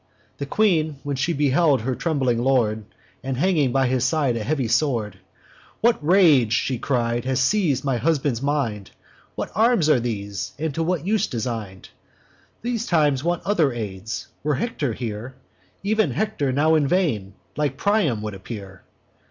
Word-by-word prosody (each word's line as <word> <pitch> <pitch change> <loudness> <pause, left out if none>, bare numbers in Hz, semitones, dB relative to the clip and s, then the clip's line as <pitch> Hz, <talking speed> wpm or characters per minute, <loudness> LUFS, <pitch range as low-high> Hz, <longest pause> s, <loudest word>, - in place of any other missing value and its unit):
The 140 - -4
Queen, 160 -5 +2
when 145 -1 -2
she 135 +6 0
beheld 145 -2 +2
her 130 +3 -1
trembling 130 -3 0
lord, 115 -4 +1 0.4
And 135 -1 -3
hanging 150 -5 +2
by 135 +1 +2
his 130 -1 +1
side 135 -2 +1
a 115 - -3
heavy 135 -1 -1
sword, 115 -7 0 0.6
'What 235 -8 +2
rage,' 155 - +5
she 125 0 0
cried, 120 -3 0
'has 130 -1 0
seiz'd 145 -3 +1
my 135 -3 +1
husband's 140 -3 0
mind? 130 -9 -1 0.5
What - - -4
arms 220 -7 +3
are 140 - +5
these, 100 -4 -4
and 155 0 -2
to 165 - -2
what 170 -1 -1
use 215 +1 +1
design'd? 110 -6 -5 0.7
These 235 -1 -2
times 150 -5 +2
want 175 +1 -1
other 165 -10 +2
aids! 105 -1 -5 0.2
Were 150 0 0
Hector 145 - -2
here, 115 +2 -6 0.5
Ev'n 215 +1 +2
Hector 210 -11 -1
now 150 +4 +3
in 155 -3 +3
vain, 115 - 0 0.2
like 145 -3 -1
Priam, 190 - +1
would 105 -1 -4
appear. 95 -1 -9
135 Hz, 160 wpm, -23 LUFS, 115-160 Hz, 0.7 s, rage